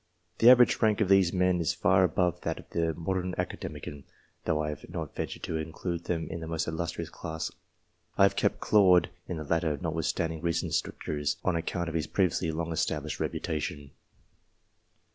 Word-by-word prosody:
The 115 - +8
average 125 -1 +6
rank 110 -2 +3
of 105 -4 +1
these 95 -3 +5
men 90 -1 +2
is 85 +1 0
far 95 +2 +4
above 90 0 +1
that - - -2
of - - -14
a 85 -1 0
modern 90 +1 -2
Academician, 70 -1 -5 0.4
though 75 - +1
I 75 - -1
have 75 -2 -7
not - - -5
ventured - - -4
to 80 - -2
include 85 +2 -4
them 85 -2 -2
in 85 - -4
the 80 - -6
most 80 -1 -2
illustrious 85 0 -3
class. 80 -1 -5 0.7
I - - +6
have - - +4
kept - - +1
Claude 90 -4 +5 0.2
in 90 - -3
the 80 - -4
latter, 80 0 0
notwithstanding 80 0 -2
recent 85 0 -1
strictures, 75 -1 -1
on 90 - +2
account 85 +1 -2
of 85 - -4
his 80 -1 -1
previously 90 -3 +1
long 80 +1 -3
established 80 - -2
reputation. 75 -2 -3
85 Hz, 180 wpm, -29 LUFS, 80-90 Hz, 0.7 s, The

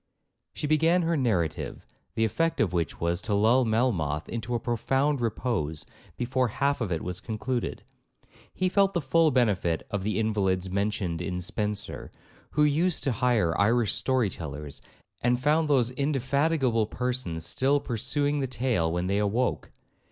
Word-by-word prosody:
She - - -3
began 160 +4 +3
her 165 0 +1
narrative, 95 - -1 0.3
the 115 - +2
effect 165 +9 0
of 105 -5 +1
which 85 -2 -1
was, 85 +2 -1
to 105 - -1
lull 115 +5 +4
Melmoth 100 - 0
into 120 +1 -3
a - - 0
profound 135 +4 0
repose 105 - -2 0.3
before 125 +1 0
half 140 +4 0
of 105 -5 -2
it 80 - -2
was 90 0 -4
concluded; 120 +4 -3 0.7
he 185 - -1
felt 195 +1 +3
the - - +3
full 160 +4 +3
benefit 105 - +1
of 105 - -1
the 105 +2 -1
invalids 95 -4 0
mentioned 100 -4 -1
in 90 0 -3
Spenser, 105 +2 -3 0.4
who 150 - +2
used 155 +4 +2
to 135 - +1
hire 115 -8 +1
Irish 115 +1 +3
story 130 -6 +1
tellers, 75 -3 -7 0.4
and 120 0 +2
found 150 +4 +2
those 125 -4 +3
indefatigable 135 -3 +1
persons 120 -10 -3
still 135 - +2
pursuing 145 +4 -1
the 135 - -1
tale 115 -9 0
when 90 +1 -1
they 100 +2 +1
awoke. 110 +5 0
115 Hz, 155 wpm, -27 LUFS, 95-135 Hz, 0.7 s, lull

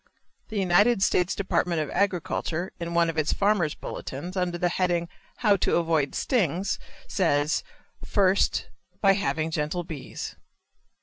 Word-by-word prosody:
The 220 - -5
United 195 +3 +4
States 180 -2 +2
Department 180 -3 0
of 150 -2 -2
Agriculture, 180 -2 -1
in 170 0 -4
one 170 0 +4
of 160 -1 -1
its 155 - +1
"Farmer's 200 -7 +2
Bulletins," 175 +8 -6
under 180 -2 -1
the 175 - +1
heading, 175 -1 0 0.3
"How 210 -4 +4
to - - +1
Avoid 160 -4 +1
Stings," 190 - 0 0.3
says, 150 -5 +1 0.4
"First, 195 -1 +2 0.3
by 195 -1 +5
having 160 -4 -1
gentle 160 +3 -1
bees." 155 -5 -7
175 Hz, 135 wpm, -26 LUFS, 160-195 Hz, 0.4 s, by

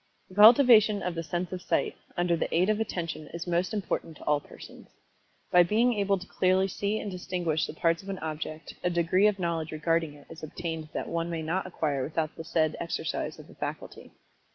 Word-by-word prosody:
The - - -14
cultivation 220 -2 +7
of 180 - -2
the 165 - -3
sense 175 +2 -3
of 185 -1 -5
Sight, 180 - 0 0.2
under 175 -1 +2
the - - -2
aid 180 +5 +3
of 215 - -1
Attention 165 -7 -3
is 170 - -5
most 175 +1 0
important 185 -6 -3
to - - -13
ail 150 -1 +3
persons. - - -13 0.6
By 180 - +7
being 225 +8 +3
able 200 -2 +1
to 185 - -9
clearly 185 0 +2
see 200 +3 -2
and 205 - -4
distinguish 175 -4 -1
the - - -8
parts 165 +1 +1
of 195 - -11
an 195 - -3
object, 155 -1 -5
a 180 - +2
degree 175 +3 +3
of 210 -2 +1
knowledge 170 -3 -2
regarding 160 0 0
it 145 - -16
is 165 - -11
obtained 160 0 -5
that - - -3
one 170 0 -2
may 165 -2 -3
not 180 +4 -1
acquire 150 -6 -1
without 155 +2 -2
the 165 - -7
said 160 -1 +1
exercise 165 -1 -3
of - - -12
the - - -15
faculty. - - -6
170 Hz, 210 wpm, -28 LUFS, 160-190 Hz, 0.6 s, cultivation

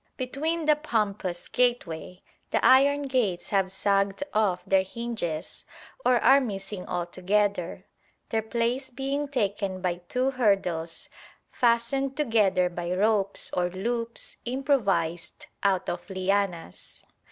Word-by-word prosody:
Between 305 +6 -2
the 300 0 +5
pompous 210 - -2
gateway 195 -8 -1 0.3
the - - +1
iron 285 +2 +6
gates 245 -10 0
have 195 -2 +2
sagged 195 +3 +1
off 200 -4 +1
their 195 -1 +4
hinges 190 -6 -4 0.4
or 250 - +4
are 275 +1 +6
missing 195 -4 -5
altogether, 185 +1 -1 0.4
their 225 - +1
place 235 +4 -1
being 275 +3 -2
taken 200 -7 -1
by 180 -1 -1
two 255 +1 +1
hurdles 195 -9 0 0.4
fastened 245 +3 +1
together 210 -10 +3
by 175 0 -4
ropes 200 +1 +1
or 180 0 +1
loops 230 +5 -2
improvised 210 - 0 0.2
out 195 -2 +1
of 175 +2 -4
lianas. 185 - -2
205 Hz, 115 wpm, -27 LUFS, 185-250 Hz, 0.4 s, iron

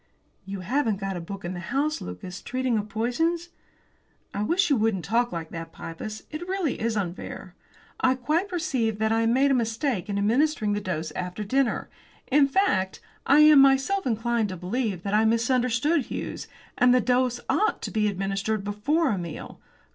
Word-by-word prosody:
"You 195 -1 -5
haven't 225 +1 0
got 195 -1 -3
a 175 - -4
book 195 +2 -7
in 175 - -3
the 175 - -5
house, 280 - -1
Lucas, 135 - -7
treating 255 -1 -1
of 210 0 -2
poisons?" 325 - -1 0.8
"I 200 - -2
wish 340 - +2
you - - +6
wouldn't 215 -7 0
talk 235 +6 +1
like 165 -2 -5
that, 165 -1 -7
Pybus. 210 +8 -7
It 315 +3 -6
really 370 -7 -1
is 225 -1 0
unfair. 185 -3 -5 0.5
I 260 0 +3
quite 305 +9 0
perceive 255 - -1
that 220 +1 +1
I 225 0 +2
made 265 +4 +3
a - - +4
mistake 230 - -1
in 200 - -1
administering 220 +1 +2
the 205 - -1
dose 165 -5 -3
after 180 +5 -4
dinner; 260 +5 0 0.4
in 280 +1 +4
fact, 270 - +1 0.3
I 285 +3 +7
am 305 -1 +8
myself 275 +8 +4
inclined 230 -1 0
to 185 - -5
believe 190 0 -2
that 200 - -3
I 215 +1 +4
misunderstood 250 +5 +2
Hughes, - - -5 0.3
and 250 0 +6
that 250 - +4
the - - -9
dose 250 -1 +1
ought 430 +1 +1
to - - -4
be 215 -1 +1
administered 195 +2 -1
before 245 +10 +1
a 200 - -1
meal." 170 -3 -7
225 Hz, 185 wpm, -26 LUFS, 195-275 Hz, 0.8 s, am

